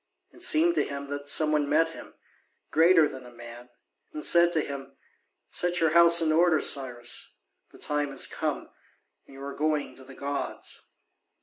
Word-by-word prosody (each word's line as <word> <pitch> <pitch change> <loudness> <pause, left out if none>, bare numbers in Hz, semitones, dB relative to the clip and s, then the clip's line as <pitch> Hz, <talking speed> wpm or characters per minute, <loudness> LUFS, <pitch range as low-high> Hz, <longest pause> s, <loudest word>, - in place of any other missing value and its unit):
It - - -17
seemed 165 +3 +3
to 150 -3 0
him 140 0 -7
that 145 0 -4
some 155 +1 +4
one 150 -2 0
met 165 +2 +2
him, 165 - -13 0.6
greater 165 0 +4
than 130 -2 -10
a 125 - -13
man, 120 +1 -13 0.4
and 150 - -4
said 170 0 +4
to 160 - +1
him, 135 -1 -8 0.5
"Set 175 0 -1
your 160 -1 +2
house 170 0 +6
in 155 - +1
order, 165 0 +3
Cyrus: 125 -5 -2 0.4
the - - -17
time 150 -1 -2
has 135 - +2
come, - - -4 0.6
and 135 - -16
you 135 - -11
are 140 0 -6
going 150 0 -2
to 130 - -13
the 130 0 -14
gods." 140 0 -5
150 Hz, 180 wpm, -26 LUFS, 135-165 Hz, 0.6 s, house